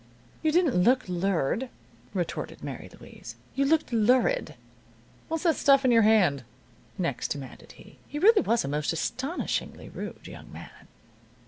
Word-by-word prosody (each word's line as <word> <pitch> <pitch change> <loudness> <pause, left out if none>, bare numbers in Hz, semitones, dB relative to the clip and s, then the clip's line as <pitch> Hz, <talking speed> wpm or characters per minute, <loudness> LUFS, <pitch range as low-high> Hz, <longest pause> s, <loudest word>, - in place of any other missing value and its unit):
"You 315 - +2
didn't 330 - +2
look 250 +5 +3
lured," 185 - -1 0.5
retorted 175 -3 -4
Mary - - -7
Louise. - - -12 0.2
"You 275 - +1
looked 315 -3 +1
lurid." 250 - +2 0.7
"What's 325 -1 -3
that 330 -3 +3
stuff 275 -1 +4
in 255 - +4
your 230 -1 +6
hand?" 190 - +3 0.5
next 170 - -2
demanded 140 -3 -7
he. - - -17
He 295 - -6
really 415 +6 +5
was 230 +1 +1
a - - -4
most 150 +1 -1
astonishingly 260 - -3
rude - - -8
young - - -11
man. - - -12
240 Hz, 145 wpm, -27 LUFS, 180-295 Hz, 0.7 s, your